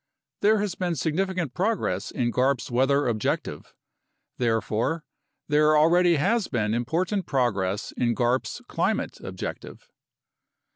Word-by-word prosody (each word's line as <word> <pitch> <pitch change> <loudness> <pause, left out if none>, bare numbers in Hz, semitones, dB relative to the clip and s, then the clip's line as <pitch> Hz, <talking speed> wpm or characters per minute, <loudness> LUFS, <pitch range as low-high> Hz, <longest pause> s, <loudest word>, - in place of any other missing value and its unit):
There 215 +2 +4
has 205 -3 -1
been 180 -2 -2
significant 170 0 -1
progress 180 - -1
in 120 -2 -1
garp's 130 -1 0
weather 135 +4 +2
objec 110 -3 0
tive; - - -9 0.7
therefore, 115 +6 0 0.4
there 150 +1 +4
already 170 +3 +4
has 210 +9 +1
been 110 -3 -1
important 170 - -1
progress 105 -7 0
in 120 -1 0
garp's 125 +2 -1
climate - - -1
objective. - - -7
140 Hz, 115 wpm, -25 LUFS, 120-175 Hz, 0.7 s, There